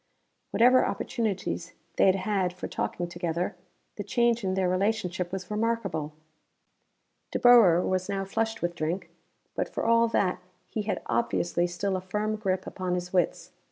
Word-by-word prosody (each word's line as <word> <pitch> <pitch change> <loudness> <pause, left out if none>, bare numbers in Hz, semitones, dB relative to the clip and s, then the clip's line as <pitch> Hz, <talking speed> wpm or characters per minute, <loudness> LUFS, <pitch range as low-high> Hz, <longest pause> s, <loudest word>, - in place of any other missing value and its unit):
Whatever 250 +2 +5
opportunities 195 -7 -2 0.2
they - - +5
had 190 - +5
had 190 -2 0
for 180 - -6
talking 175 - -3
together, 175 0 -2 0.4
the 205 - -3
change 235 +2 +1
in 190 -1 0
their 190 -1 +1
relationship 185 -2 0
was 190 0 -5
remarkable. 210 -9 -1 1.2
De - - -2
Boer 225 -9 +7
was 185 0 -1
now 195 -1 -1
flushed 225 +2 -2
with 175 0 0
drink, 170 +3 -3 0.4
but - - -2
for - - -3
all 230 0 +4
that 190 -5 +1 0.3
he 215 - -3
had 210 0 -3
obviously 175 -6 0
still 190 +3 -2
a 185 - -2
firm 210 +4 -2
grip 190 -3 -1
upon 185 -1 -3
his 180 +1 -5
wits. 180 -2 0
190 Hz, 160 wpm, -28 LUFS, 180-220 Hz, 1.2 s, Boer